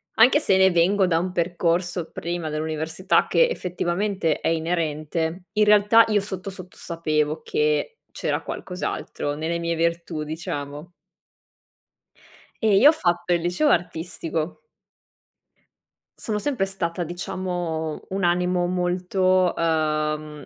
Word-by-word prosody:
anche 250 Hz, +6 st, +6 dB
se 190 Hz, -8 st, +4 dB
vengo 185 Hz, +3 st, +3 dB
da 165 Hz, -2 st, +2 dB
un 180 Hz, +1 st, -3 dB
percorso 175 Hz, 0 st, 0 dB
prima 170 Hz, -2 st, -4 dB
dell'università 160 Hz, +4 st, 0 dB
che -, -, +4 dB
effettivamente 180 Hz, -, -1 dB
è -, -, -2 dB
inerente. 165 Hz, +1 st, -1 dB
In 210 Hz, -, +5 dB
realtà 210 Hz, +2 st, +6 dB
io 210 Hz, -2 st, +2 dB
sotto 195 Hz, -1 st, -6 dB
sotto 185 Hz, -2 st, -11 dB
sapevo 155 Hz, -2 st, -1 dB
che 150 Hz, -, 0 dB, 0.2 s
c'era -, -, -2 dB
qualcos'altro 180 Hz, -5 st, -4 dB
nelle 160 Hz, +3 st, -2 dB
mie 170 Hz, 0 st, -1 dB
virtù, 170 Hz, -1 st, -1 dB
diciamo. 155 Hz, 0 st, -6 dB, 1.7 s
Ehm, 215 Hz, -2 st, +4 dB
io 285 Hz, -, +8 dB
ho -, -, +7 dB
fatto 175 Hz, -, 0 dB
il 170 Hz, -, +1 dB
liceo 175 Hz, -, +1 dB
artistico. 165 Hz, -, -2 dB, 1.6 s
Sono 210 Hz, -2 st, -3 dB
sempre 250 Hz, -5 st, 0 dB
stata, 180 Hz, -3 st, -3 dB
diciamo, 175 Hz, -2 st, -4 dB
un 195 Hz, 0 st, -2 dB
animo 180 Hz, 0 st, +2 dB
molto, 180 Hz, +1 st, +1 dB
uhm, 155 Hz, -2 st, -1 dB
175 Hz, 115 wpm, -24 LUFS, 160-185 Hz, 1.7 s, io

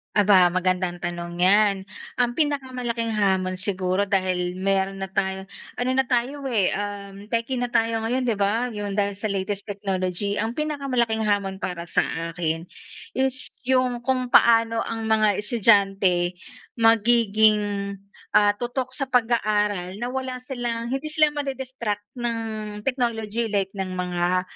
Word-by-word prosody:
Aba! 200 Hz, -3 st, +6 dB
Magandang 185 Hz, -1 st, 0 dB
tanong 175 Hz, 0 st, -4 dB
'yan. 195 Hz, 0 st, +3 dB, 0.3 s
Ang 240 Hz, 0 st, 0 dB
pinakamalaking 255 Hz, -6 st, -1 dB
hamon 190 Hz, -2 st, +1 dB
siguro, 185 Hz, 0 st, 0 dB
dahil 185 Hz, -3 st, 0 dB
meron 195 Hz, 0 st, 0 dB
na 195 Hz, -, -3 dB
tayong 190 Hz, 0 st, -2 dB, 0.2 s
ano 245 Hz, +1 st, -2 dB
na 265 Hz, +1 st, +2 dB
tayo, 260 Hz, +3 st, -1 dB
eh, 220 Hz, -8 st, +2 dB
uhm, 200 Hz, -1 st, -5 dB
techie 230 Hz, +3 st, 0 dB
na 245 Hz, -, 0 dB
tayo 230 Hz, -1 st, +1 dB
ngayon, 250 Hz, +3 st, 0 dB
di 235 Hz, -5 st, 0 dB
ba, 220 Hz, +5 st, +1 dB
yung 205 Hz, -3 st, -4 dB
dahil 200 Hz, -1 st, 0 dB
sa 210 Hz, -, -6 dB
latest 200 Hz, 0 st, -2 dB
technology. 195 Hz, -1 st, -2 dB
Ang 225 Hz, +2 st, -1 dB
pinakamalaking 255 Hz, -7 st, -1 dB
hamon 200 Hz, -2 st, 0 dB
para 175 Hz, -3 st, -5 dB
sa -, -, +2 dB, 0.2 s
akin 165 Hz, -1 st, -2 dB, 0.6 s
is 260 Hz, -1 st, -1 dB, 0.2 s
yung 255 Hz, -2 st, +1 dB
kung 255 Hz, -2 st, 0 dB
paano 230 Hz, -1 st, +5 dB
ang 225 Hz, -1 st, -4 dB
mga 215 Hz, -2 st, +3 dB
estudyante 195 Hz, -5 st, +2 dB, 0.4 s
magiging, 215 Hz, -3 st, +3 dB, 0.4 s
ah, 205 Hz, -1 st, +6 dB
tutok 245 Hz, +2 st, -3 dB
sa 275 Hz, -, -1 dB
pag-aaral 210 Hz, -7 st, +1 dB
na 245 Hz, -, -1 dB
wala 255 Hz, -1 st, -4 dB
silang 240 Hz, -3 st, -3 dB
hindi 270 Hz, +4 st, -2 dB
sila 310 Hz, 0 st, +3 dB
madi-distract 260 Hz, -7 st, -3 dB, 0.2 s
ng 220 Hz, -3 st, -4 dB
technology 235 Hz, -3 st, -1 dB
like 200 Hz, -3 st, 0 dB
ng 185 Hz, -1 st, -3 dB
mga 180 Hz, 0 st, 0 dB
210 Hz, 140 wpm, -24 LUFS, 195-240 Hz, 0.6 s, Aba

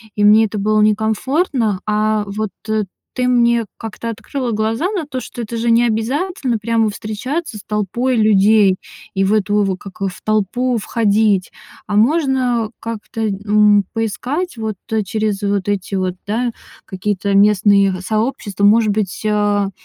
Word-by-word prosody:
и 205 Hz, -, 0 dB
мне 215 Hz, +2 st, +6 dB
это 210 Hz, 0 st, -5 dB
было 215 Hz, +1 st, +2 dB
некомфортно, 220 Hz, -, +1 dB
а 215 Hz, 0 st, +1 dB
вот 210 Hz, +1 st, -3 dB
т 215 Hz, -1 st, -1 dB, 0.3 s
ты 250 Hz, -1 st, 0 dB
мне 235 Hz, -2 st, +3 dB
как-то 225 Hz, +1 st, -6 dB
открыла 245 Hz, +2 st, -4 dB
глаза 225 Hz, -, 0 dB
на 375 Hz, -7 st, -2 dB
то, 270 Hz, -3 st, -5 dB
что 240 Hz, -1 st, -7 dB
это 230 Hz, +1 st, -6 dB
же 230 Hz, +1 st, 0 dB
не 235 Hz, +1 st, +4 dB
обязательно 255 Hz, -, -1 dB
прямо 225 Hz, 0 st, +1 dB
встречаться 220 Hz, +5 st, -4 dB
с -, -, -10 dB
толпой 215 Hz, +5 st, -1 dB
людей 210 Hz, -2 st, +4 dB, 0.4 s
и 195 Hz, 0 st, +1 dB
в 195 Hz, +2 st, +2 dB
эту 210 Hz, 0 st, +2 dB
в 195 Hz, -2 st, 0 dB
как 195 Hz, +1 st, -12 dB
в 190 Hz, -2 st, -3 dB
толпу 215 Hz, +4 st, 0 dB
входить, 210 Hz, -3 st, +1 dB, 0.3 s
а 205 Hz, -, -3 dB
можно 250 Hz, -3 st, +2 dB
как-то, 225 Hz, 0 st, -6 dB
н 205 Hz, 0 st, +3 dB
поискать 245 Hz, -, -3 dB
вот 220 Hz, -2 st, -4 dB, 0.3 s
через 210 Hz, 0 st, -2 dB
вот 200 Hz, -1 st, 0 dB
эти 200 Hz, -1 st, -2 dB
вот, 185 Hz, -2 st, -1 dB
да, 230 Hz, +3 st, -1 dB, 0.3 s
какие-то 200 Hz, 0 st, -2 dB
местные 200 Hz, -2 st, +4 dB
сообщества. 215 Hz, -1 st, -2 dB
Может 215 Hz, +2 st, +5 dB
быть, 200 Hz, -3 st, -2 dB
э, 205 Hz, -1 st, +1 dB
215 Hz, 150 wpm, -18 LUFS, 205-235 Hz, 0.4 s, мне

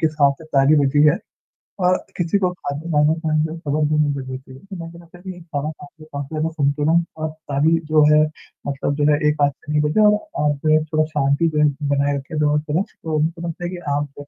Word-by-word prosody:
किस 155 Hz, -2 st, +1 dB
हाथ 140 Hz, -1 st, +6 dB
से 160 Hz, -, -12 dB
ताली 145 Hz, 0 st, +3 dB
बजी 145 Hz, +2 st, +3 dB
है 150 Hz, -, +3 dB, 0.7 s
और 185 Hz, -, +4 dB, 0.2 s
किसी 175 Hz, +2 st, +1 dB
को 180 Hz, -, +1 dB, 0.2 s
कानों 150 Hz, +1 st, +1 dB
कान 155 Hz, -2 st, 0 dB
जो 160 Hz, -, -3 dB
है 165 Hz, -, -8 dB
खबर 150 Hz, 0 st, 0 dB
भी 155 Hz, -, +1 dB
नहीं 150 Hz, -1 st, +2 dB
लगनी 130 Hz, -1 st, -5 dB
चाहिए 130 Hz, 0 st, -14 dB
कि 195 Hz, -, -7 dB
मैं 165 Hz, -2 st, -7 dB
जो 170 Hz, -, -13 dB
है 170 Hz, -, -15 dB, 0.2 s
मैंने 180 Hz, -2 st, -7 dB
कहा 145 Hz, +1 st, -2 dB, 0.4 s
काफी 140 Hz, -1 st, -4 dB
ज़्यादा 155 Hz, +1 st, 0 dB
संतुलन 155 Hz, +2 st, +1 dB
और 155 Hz, 0 st, -2 dB
ताली 155 Hz, +1 st, 0 dB
जो 155 Hz, -1 st, +5 dB
है 150 Hz, 0 st, +6 dB, 0.4 s
मतलब 145 Hz, +1 st, 0 dB
एक 150 Hz, 0 st, +1 dB
हाथ 145 Hz, -, +5 dB
से 150 Hz, -, -11 dB
नहीं 150 Hz, 0 st, +2 dB
बजती 215 Hz, +8 st, +2 dB
और 210 Hz, -, +6 dB, 0.3 s
आप 155 Hz, +2 st, +2 dB
थोड़ा 155 Hz, 0 st, +3 dB
शांति 145 Hz, +3 st, +2 dB
बनाए 145 Hz, -1 st, +1 dB
रखें 150 Hz, +3 st, -4 dB
और 150 Hz, 0 st, +2 dB
थोड़ा 160 Hz, +5 st, +1 dB
तो 160 Hz, -6 st, -5 dB
उनको 165 Hz, +2 st, -1 dB
लगता 170 Hz, +1 st, -6 dB
है 175 Hz, -, -2 dB
कि 180 Hz, -, -6 dB, 0.2 s
आप 145 Hz, 0 st, -6 dB
150 Hz, 215 wpm, -21 LUFS, 145-160 Hz, 0.7 s, हाथ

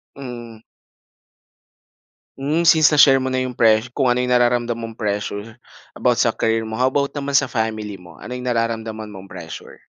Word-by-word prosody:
Mm. 120 Hz, -4 st, -9 dB, 1.8 s
Hmm, 155 Hz, +5 st, 0 dB
since 160 Hz, -2 st, +6 dB
na-share 140 Hz, -3 st, +6 dB
mo 130 Hz, -, -2 dB
na 130 Hz, -, -1 dB
'yong 125 Hz, -, -5 dB
pre 110 Hz, -1 st, +3 dB
kung 130 Hz, -1 st, +1 dB
ano 120 Hz, -, +2 dB
'yong 125 Hz, 0 st, 0 dB
nararamdam 120 Hz, -1 st, +2 dB
mong 115 Hz, -1 st, -8 dB
pressure 105 Hz, +1 st, -3 dB, 0.4 s
about -, -, +1 dB
sa -, -, +2 dB
career 115 Hz, 0 st, 0 dB
mo, 110 Hz, -, -7 dB
how 125 Hz, +3 st, +2 dB
about 140 Hz, +1 st, -1 dB
naman 140 Hz, -1 st, 0 dB
sa 140 Hz, -, +3 dB
family 110 Hz, -3 st, -3 dB
mo, 85 Hz, -, -15 dB
ano 125 Hz, -, -8 dB
'yong 125 Hz, 0 st, -4 dB
nararamdaman 110 Hz, -2 st, -3 dB
mong 95 Hz, 0 st, -11 dB
pressure? 85 Hz, -3 st, -10 dB
120 Hz, 175 wpm, -20 LUFS, 110-130 Hz, 1.8 s, since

